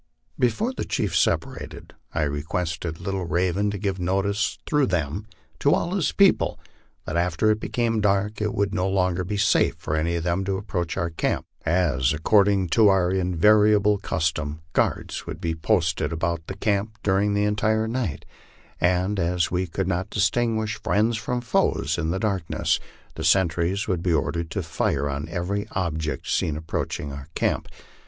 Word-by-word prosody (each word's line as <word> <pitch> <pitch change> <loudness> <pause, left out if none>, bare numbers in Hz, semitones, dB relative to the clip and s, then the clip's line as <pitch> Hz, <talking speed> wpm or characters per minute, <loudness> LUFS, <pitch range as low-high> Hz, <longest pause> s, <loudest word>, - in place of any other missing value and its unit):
Before 210 - +1
the - - -3
chiefs - - 0
separated, - - -2 0.2
I 80 - 0
requested 80 +3 -3
Little 95 0 -3
Raven 90 +5 +1
to 100 - -3
give 95 -1 -2
notice 95 +4 0
through 150 -3 +2
them 90 +3 -2 0.3
to - - +4
all 175 - -1
his 190 -6 +1
people, 200 -2 +3 0.5
that 80 - -4
after 90 +5 +2
it 105 - 0
became 115 -1 0
dark 105 +1 +1
it 105 0 -1
would 100 -1 0
no 95 -1 0
longer 90 -2 +1
be 105 +3 -3
safe 105 +1 +3
for 75 - -3
any 80 +2 0
of 85 - -2
them 90 +3 0
to 95 0 -1
approach 90 -4 -3
our 85 0 -1
camp, 80 - -1 0.2
as, 80 -7 +2
ac 75 - -9
cording 100 -3 +4
to 110 +5 +5
our 95 -2 +3
invariable 105 +3 +4
custom, 75 -4 -2
guards - - -1
would - - -6
be 85 -1 -1
posted 80 -3 0
about 85 0 -2
camp 105 +1 0
during 100 +1 +2
the 105 - +2
entire 110 +1 +1
night; 115 - -3 0.5
and 90 +3 +1
as 85 0 +1
we 90 +1 0
could 90 +3 -2
not 95 +2 -1
distinguish 110 +1 0
friends 110 +2 +2
from 120 +2 -2
foes 85 - +1
in 80 -1 -1
the 90 - 0
dark 100 -2 0
ness, - - +1 0.3
the 80 - -6
sentries 85 +4 +2
would 90 -5 0
be 90 -1 +1
ordered 80 +1 -1
to 95 +3 -3
fire 70 -3 -1
on 70 +3 -4
every 95 +4 -2
object 80 -6 -2
seen 75 -2 0
approaching 75 -2 -4
our 70 +1 -8
camp. - - 0
95 Hz, 170 wpm, -24 LUFS, 85-105 Hz, 0.5 s, to